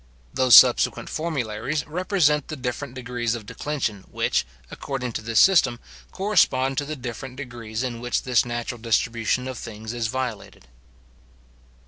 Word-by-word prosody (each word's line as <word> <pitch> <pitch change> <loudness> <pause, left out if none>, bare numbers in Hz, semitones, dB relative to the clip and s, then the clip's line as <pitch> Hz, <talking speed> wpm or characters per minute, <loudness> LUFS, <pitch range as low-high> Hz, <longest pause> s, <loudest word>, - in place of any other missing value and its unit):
Those 130 -3 +7
subsequent - - +5
formularies 145 -3 -2
represent 160 -3 +1
the 155 - -5
different 125 0 -5
degrees 120 -2 -2
of 110 -3 -8
declension 115 -6 -3
which, - - 0 0.2
according 130 -3 -4
to - - -3
this 115 0 +1
system, 135 -11 +5 0.3
correspond 135 -10 +2
to 145 - -3
the 155 +2 -5
different 125 0 -7
degrees 120 -4 -6
in 120 -2 -4
which 120 0 -1
this 125 -2 +3
natural 120 0 -5
distribution 115 +2 0
of 130 -2 -6
things 110 +1 -7
is 120 -2 -1
violated. 120 - -5
125 Hz, 140 wpm, -24 LUFS, 115-140 Hz, 0.3 s, Those